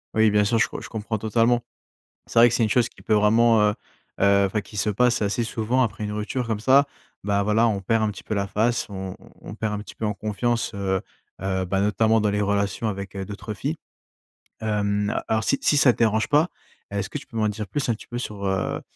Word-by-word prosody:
Oui 110 -1 +5
bien 105 0 +3
sûr, 115 +2 +1
je - - +3
co - - -7
je - - -9
comprends 110 0 -3
totalement. 115 +3 +2 0.7
C'est - - -6
vrai 120 - +9
que 115 - -3
c'est 115 - +1
une 110 - +2
chose 120 +1 +2
qui - - -19
peut 110 - +1
vraiment, 110 +2 +4
heu - - -5 0.5
heu 100 0 +5
enfin 105 +2 -1
qui 105 +2 -12
se 105 +2 +1
passe 120 +1 +2
assez 110 +4 0
souvent 115 +3 0
après 110 -2 -1
une 105 - -3
rupture 105 +4 -3
comme 110 -2 -2
ça. 135 +5 +5 0.4
Bah 100 0 +1
voilà, 105 +3 +3
on 100 -3 -1
perd 115 +3 +1
un 105 - +1
petit - - -10
peu 110 - -3
la 100 0 0
face, 110 +4 0
on 95 -2 -6
on - - -17
on 105 - -9
perd 110 -1 -2
un 105 - -3
petit 105 - -10
peu 110 - -3
en 105 - 0
confiance. 110 +3 -1
Heu 95 -1 -1 0.4
heu, 95 -1 -1
bah, 95 +2 0
notamment 110 +2 +2
dans 105 - +2
les 105 +1 0
relations 100 +2 0
avec, 100 -1 -5
heu, 95 - -4
d'autres 105 +2 -7
filles. 150 +9 -3 0.8
Hem, 105 -1 0
heu, - - 0
alors 110 0 +1
si 140 - +1
si 145 - +3
ça 130 -4 +6
te - - -17
dérange 110 -1 +2
pas, 150 +3 +4 0.4
est-ce 100 -1 -3
que 145 - -3
tu 135 - -15
peux 115 -4 -8
m'en 110 - +2
dire 105 0 -4
plus 145 +3 -2
un 120 - +2
petit 110 - -11
peu 120 - -5
sur, 105 -5 -5
heu, 95 0 -1
105 Hz, 255 wpm, -24 LUFS, 100-115 Hz, 0.8 s, vrai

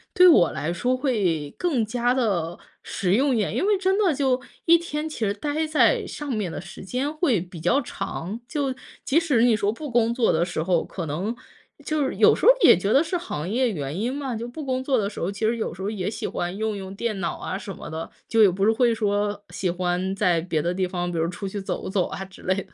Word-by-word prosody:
对 365 0 +8
我 300 - +6
来 165 +3 -2
说 250 +8 0
会 185 - 0
更 280 -11 +1
加 245 +2 +1
地 180 -9 0 0.3
实 185 -2 -1
用 265 +5 +3
一 - - +1
点。 210 - -1
因 - - +1
为 415 0 +4
真 385 +1 +2
的 385 -6 +3
就 265 -2 +1 0.3
一 340 +1 +7
天 315 -2 -4
其 - - -8
实 205 -3 +1
待 295 +8 -2
在 305 - +3
上 295 - -6
面 210 -8 -2
的 - - -5
时 180 +1 -10
间 260 +8 -2
会 300 - +1
比 175 -1 -9
较 175 - +2
长， 205 -3 -5
就 275 -1 -1 0.3
即 310 +5 +3
使 290 -9 +2
你 235 -3 +5
说 205 0 +1
不 295 +6 -7
工 235 -1 +2
作 235 -2 +2
的 165 +2 +2
时 175 -3 -3
候， 175 -1 +2
可 175 -4 -5
能 190 +11 -2 0.5
就 310 -1 0
是 265 - -2
有 - - +6
时 - - -3
候 - - +10
也 - - +8
觉 200 +4 0
得 280 - +5
是 350 +2 -2
行 170 - -5
业 245 +1 +1
原 150 0 -4
因 240 +4 -1
嘛， 270 -4 -3
就 235 +2 -4
不 300 +6 -7
工 260 -1 -1
作 265 -2 +1
的 200 -2 0
时 - - -9
候， 180 +4 -1
其 195 - -9
实 230 +1 0
有 220 - -3
时 190 - -10
候 195 - -1
也 205 -3 -2
喜 - - -4
欢 175 +2 -3
用 220 0 -2
用 195 0 -7
电 215 -2 -2
脑 170 - -2
啊 190 - -4
什 195 -1 -7
么 - - -9
的， 160 +1 -5 0.2
就 225 - +3
也 200 - +7
不 195 +2 0
是 220 - +5
会 235 +1 +3
说 205 -1 -1
喜 185 - -2
欢 180 +2 -1
在 180 -4 +2
别 160 -3 -1
的 175 +2 -1
地 185 0 0
方， 175 -1 -3
比 170 - -3
如 160 - +1
出 195 +2 -5
去 200 +1 -4
走 190 - -4
走 190 -2 +1
啊 195 - -5
之 190 - -15
类 185 - +2
的。 195 -1 -6
210 Hz, 275 characters per minute, -24 LUFS, 185-260 Hz, 0.5 s, 候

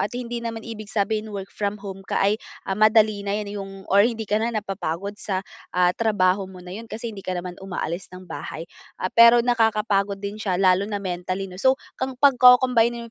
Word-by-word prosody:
At - - 0
hindi 240 -1 -4
naman 230 -1 -5
ibig 215 -2 -8
sabihin 215 +1 -1
work-from-home 200 -1 -5
ka - - -1
ay, 205 +2 +2 0.2
ah, - - -2
madali 215 0 +4
na 200 0 -2
yan, 205 -1 -4
yung 195 0 -7 0.2
or 200 - +7
hindi 225 -2 -4
ka 210 +1 0
na 230 - 0
napapagod 200 -2 -4
sa, 190 -1 -3 0.3
ah, 180 0 +4
trabaho 195 -3 +1
mo 185 -1 -12
na 180 - -8
'yon, 225 +4 -8
kasi 225 +1 -6
hindi 200 - -8
ka 185 -1 -4
naman 175 +1 -6
umaalis 180 -1 -4
ng 185 +1 -11
bahay. 165 -2 -7 0.3
Ah, 185 - -3
pero 235 0 +7
nakakapagod 215 -4 +1
din 200 +2 -6
siya, 190 -4 0
lalo 190 +1 +3
na 210 - -2
mentally 185 0 -3
'no? 185 -1 -9
So 260 +2 +4 0.2
kang 260 0 -2
pagko-combine-in 250 -3 +5
205 Hz, 195 wpm, -23 LUFS, 190-225 Hz, 0.3 s, or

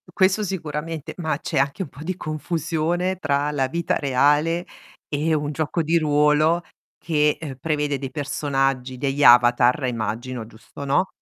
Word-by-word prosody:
Questo 190 +2 +2
sicuramente, 160 -4 -4
ma 160 -4 -1
c'è - - -3
anche 140 +7 0
un 150 - -9
po' 140 - -13
di 185 +3 -3
confusione 165 +3 -2
tra 145 -3 0
la 135 -3 0
vita 170 +5 -1
reale 150 +5 +2 0.4
e 155 +2 0
un 150 -1 -1
gioco 155 +3 -1
di 165 +2 +2
ruolo 150 +2 +3 0.4
che, 150 -2 +1
uhm, 145 -5 -6
prevede 150 -1 -1
dei 135 - -5
personaggi, 135 -3 -1
degli 140 +2 -1
avatar 120 +2 +6
immagino, 115 +1 -3
giusto, 115 +5 -11
no, 140 +7 +2
150 Hz, 150 wpm, -23 LUFS, 135-165 Hz, 0.4 s, avatar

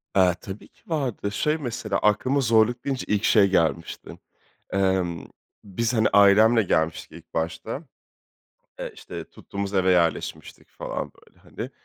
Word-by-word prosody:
Eee, 90 -2 +4
tabii 95 +1 -9
ki - - -32
vardı. 130 -10 -2
Şey, 150 +8 0
mesela, 115 -7 -3
aklıma 125 +7 +2
zorluk 115 0 +3
deyince 135 -2 -2
ilk 105 -1 0
şey 100 -2 +5
gelmişti. 85 -2 -1 0.6
Emm, 95 -3 0 0.4
biz, 110 +4 -2
hani, 110 -2 +3
ailemle 105 +3 +6
gelmiştik 80 -3 -1
ilk 85 -1 -14
başta. 85 - -3 1.0
Eee, - - -5
işte, - - -8
tuttuğumuz 100 0 -6
eve 95 -1 +3
yerleşmiştik 85 -3 -1
falan, - - -5
böyle, - - -24
hani. - - -7
100 Hz, 135 wpm, -24 LUFS, 95-115 Hz, 1.0 s, ailemle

